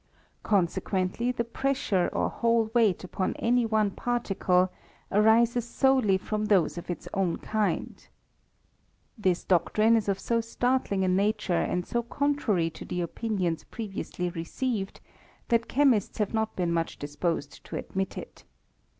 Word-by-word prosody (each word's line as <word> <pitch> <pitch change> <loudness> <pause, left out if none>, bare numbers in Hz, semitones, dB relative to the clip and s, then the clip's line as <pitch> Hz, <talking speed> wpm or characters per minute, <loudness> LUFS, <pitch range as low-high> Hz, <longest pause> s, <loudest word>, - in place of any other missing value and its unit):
Con 200 -4 +3
sequently, 190 +7 -1
the 245 -1 -1
pressure 235 -6 0
or - - 0
whole 230 -2 +1
weight 225 -7 +3
upon 185 +1 -2
any 240 0 +2
one 215 -2 +2
particle 190 -6 +1 0.4
arises 230 +3 +4
solely 250 -5 +3
from 215 +2 -2
those 195 -6 +3
of 175 - -8
its 175 - -5
own 190 -4 0
kind. 215 -1 -2 1.1
This 185 -6 0
doctrine 215 +5 +3
is 215 -3 0
of 195 -1 0
so 230 +2 0
startling 230 -4 0
a - - +1
nature 200 +1 +1
and 180 +1 0
so 240 - -1
contrary 235 - 0
to - - -10
the 180 - -4
opinions 180 -2 -2
previously 195 -5 -4
received, 195 +5 -3 0.5
that 230 -1 +2
chemists 260 -7 +2
have 210 -1 -1
not 220 0 -1
been 175 -2 0
much 165 -1 -1
disposed 145 +1 -3
to - - -7
admit 190 0 -3
it. - - -9
210 Hz, 140 wpm, -28 LUFS, 185-235 Hz, 1.1 s, arises